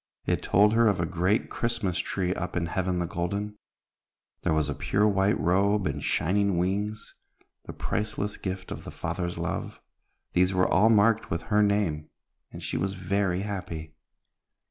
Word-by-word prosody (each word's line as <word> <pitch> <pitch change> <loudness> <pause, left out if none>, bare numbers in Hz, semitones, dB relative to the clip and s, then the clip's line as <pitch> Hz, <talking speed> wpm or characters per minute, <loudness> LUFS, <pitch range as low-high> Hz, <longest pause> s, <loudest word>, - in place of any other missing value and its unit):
it - - 0
told 105 +2 +4
her 115 0 +5
of 100 -4 +2
a 85 - +1
great 90 +5 +1
Christmas 115 -7 -1
tree 90 -1 -1
up 90 -1 -4
in 85 - 0
Heaven 90 +1 -1
the 85 - 0
Golden. 100 +5 -3 0.8
There - - 0
was 80 -2 +2
a 70 - -2
pure 105 +8 +1
white 100 0 +2
robe 100 +6 +2
and - - -2
shining 100 +2 +1
wings, 100 +4 -2 0.5
the - - -7
priceless 105 -1 -2
gift 95 -1 -5
of - - -6
the - - -8
Father's 85 +1 -3
love. - - -4 0.5
These 90 +1 +3
were 90 - +3
all 105 +5 +4
marked 110 +1 +4
with 85 0 -2
her 105 - +5
name, 100 -7 +1 0.4
and - - -9
she - - -2
was 95 0 -1
very 95 0 0
happy. 90 -6 -5
95 Hz, 165 wpm, -27 LUFS, 90-105 Hz, 0.8 s, her